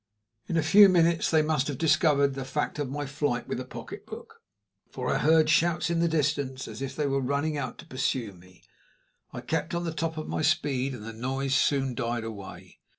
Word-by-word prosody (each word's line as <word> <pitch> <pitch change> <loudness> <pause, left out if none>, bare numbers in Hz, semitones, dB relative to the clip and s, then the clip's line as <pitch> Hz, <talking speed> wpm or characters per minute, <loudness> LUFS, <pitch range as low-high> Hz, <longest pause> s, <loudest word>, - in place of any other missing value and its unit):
In 165 - -1
a 160 - +2
few 195 +6 +8
minutes 170 -2 +3
they 160 -2 +3
must 150 -3 0
have 145 -3 -3
discovered 145 -3 +3
the 135 0 -5
fact 150 +3 -3
of 145 -3 -2
my 145 +2 -4
flight 140 -3 -2
with - - -3
the 130 - -5
pocketbook, - - -10 0.5
for 125 -1 -3
I - - 0
heard 160 0 +4
shouts 170 +1 +2
in 170 - +1
the 170 - +3
distance 140 -4 -1
as 110 +3 -8
if 135 0 -4
they 150 - -1
were 135 -1 0
running 140 +4 -1
out 130 -4 -4
to - - -12
pursue 130 -4 -2
me. 90 0 -19 0.7
I - - -7
kept 160 +1 -2
on 170 - -2
at - - -4
the 165 - -3
top 160 +1 -3
of 155 - -5
my - - -2
speed, 140 -3 0
and 110 - -10
the 115 +1 -7
noise 135 +4 -2
soon 135 -1 +2
died 120 -2 -2
away. 105 -4 -9
140 Hz, 215 wpm, -27 LUFS, 130-160 Hz, 0.7 s, few